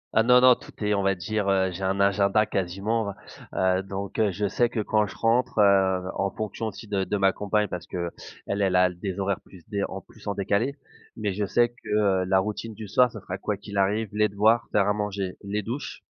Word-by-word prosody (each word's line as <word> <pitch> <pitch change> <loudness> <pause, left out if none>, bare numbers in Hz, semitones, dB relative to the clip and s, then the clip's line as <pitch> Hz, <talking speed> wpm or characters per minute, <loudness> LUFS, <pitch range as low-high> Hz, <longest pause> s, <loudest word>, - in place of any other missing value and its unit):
Ah 110 - +6
non 125 +2 +6
non, 130 0 +8
tout - - -14
est 105 - +2
on 100 - +1
va 95 0 +2
dire, 100 +3 -2
heu 95 -1 +2
j'ai 90 +2 -7
un 95 +1 0
agenda 100 +2 +3
quasiment. 100 +3 -2 0.4
Heu, 95 0 +2
donc 95 0 -5
heu, 110 -2 +3
je 100 +3 -1
sais 120 +4 +1
que 115 - -3
quand 105 0 +1
je - - -10
rentre, 115 +2 +1
heu, 95 -2 +4
en 100 0 0
fonction 110 +2 -4
aussi 110 +1 -8
de 100 -2 0
de 105 - -1
ma 95 -1 +4
compagne 105 +1 0
parce 90 - -6
qu'elle 85 -1 -4 0.3
elle 100 -2 0
a 90 0 +4
des 90 +2 -5
horaires 100 0 -1
plus 90 -3 -16
dé 100 -2 -2
en 95 - -6
plus 110 - -17
en 100 - -1
décalé 100 +7 0 0.4
mais 105 -3 -1
je 105 +2 -1
sais 120 +4 +3
que, 120 - -14 0.3
heu, - - -4
la 95 +1 +3
routine 105 +2 -4
du 110 -1 -8
soir 125 +4 +4
ça 105 - -9
sera 95 +2 -6
quoi 105 0 -2
qu'il 100 0 -8
arrive 105 +2 +1
les 105 0 +2
devoirs, 110 +4 +3
faire 100 -1 +3
à 105 - +3
manger, 100 -3 -3
les 105 +1 -2
douches 120 +8 -5
100 Hz, 235 wpm, -26 LUFS, 95-110 Hz, 0.4 s, non